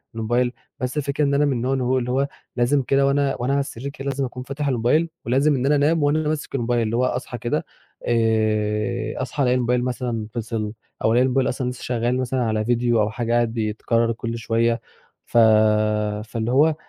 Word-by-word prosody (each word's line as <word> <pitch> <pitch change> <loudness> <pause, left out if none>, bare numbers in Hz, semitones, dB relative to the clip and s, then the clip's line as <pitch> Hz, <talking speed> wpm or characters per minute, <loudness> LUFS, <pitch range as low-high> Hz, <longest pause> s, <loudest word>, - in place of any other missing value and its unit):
الموبيل 120 +2 0 0.3
بَس 125 +3 -3
الفكرة 145 +1 0
إن 140 - +2
أنا 145 +1 +3
من 145 - +1
النوع 125 +2 -1
إن 130 - 0
هو 125 +1 +1
اللي 125 -1 -2
هو 135 +2 +1 0.3
لازم 125 +4 +2
كده 135 +2 +2
وأنا 140 0 +1
وأنا 130 +3 0
على 140 - +2
السرير 140 -1 -4
كده 140 -1 -9
لازم 135 0 -1
أكون 125 0 -7
فاتح 140 +3 -4
الموبيل 135 +6 +2 0.2
ولازم 140 +5 +3
إن 130 0 -1
أنا 145 +2 +4
أنام 150 +2 +2
وأنا 150 +2 +1
ماسك 155 -2 -3
الموبيل 120 -1 0
اللي 115 0 -1
هو 125 +2 +2
أصحى 125 -1 -3
كده 120 +1 -2 0.4
آآ، 110 -2 0
أصحى 145 - -2
ألاقي 125 -1 +3
الموبيل 125 0 +1
مثلًا 125 -3 -3
فِصل 110 -2 -3 0.3
أو 110 - +3
ألاقي 125 +2 +4
الموبيل 130 0 +1
أصلًا 125 0 -2
لسه 125 - -8
شغّال 120 0 0
مثلًا 130 0 -1
على 110 -1 0
video 120 0 +1
أو 105 -1 +2
حاجة 115 +2 -2
قاعد 120 -1 +2
بيتكرّر 115 +1 0
كُل 115 0 -4
شوية، 115 0 0 0.4
ف - - -2 0.9
فاللي 115 +1 -3
هو 150 +4 +4
125 Hz, 205 wpm, -22 LUFS, 115-135 Hz, 0.9 s, أنا